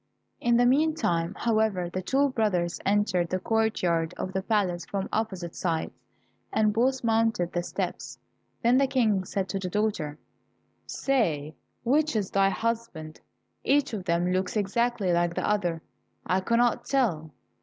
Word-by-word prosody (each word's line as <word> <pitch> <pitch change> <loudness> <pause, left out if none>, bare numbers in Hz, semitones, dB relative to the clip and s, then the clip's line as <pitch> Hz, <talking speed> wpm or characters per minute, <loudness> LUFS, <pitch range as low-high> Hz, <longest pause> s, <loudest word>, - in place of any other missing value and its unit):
In 235 0 +3
the 245 - +4
meantime, 250 - +1
however, 220 -6 +1
the 185 +2 -4
two 275 +9 +2
brothers 195 -8 0
entered 195 -4 +2
the 185 - 0
courtyard 185 -6 0
of 185 - -4
the 190 - 0
palace 190 -5 0
from 195 +3 -3
opposite 190 -6 -2
sides, 165 -3 -2 0.6
and 215 -1 +2
both 255 +4 +1
mounted 225 -6 +1
the 175 - 0
steps. - - -4 0.5
Then 245 +3 +5
the 275 - +3
King 215 -8 +1
said 190 0 -2
to 195 - -2
the 185 -1 -4
daughter, 180 -8 -1 0.7
"Say 160 - 0 0.3
which 295 +3 +2
is 205 -4 -1
thy 195 0 +3
husband. 220 -8 -3 0.4
Each 280 -2 +2
of 195 -4 -4
them 175 0 +1
looks 185 +3 -1
exactly 210 -1 0
like 170 0 +1
the - - -1
other, 175 -6 0 0.4
I 185 +2 +2
cannot 235 +4 +1
tell." 190 - 0
200 Hz, 150 wpm, -27 LUFS, 175-230 Hz, 0.7 s, Then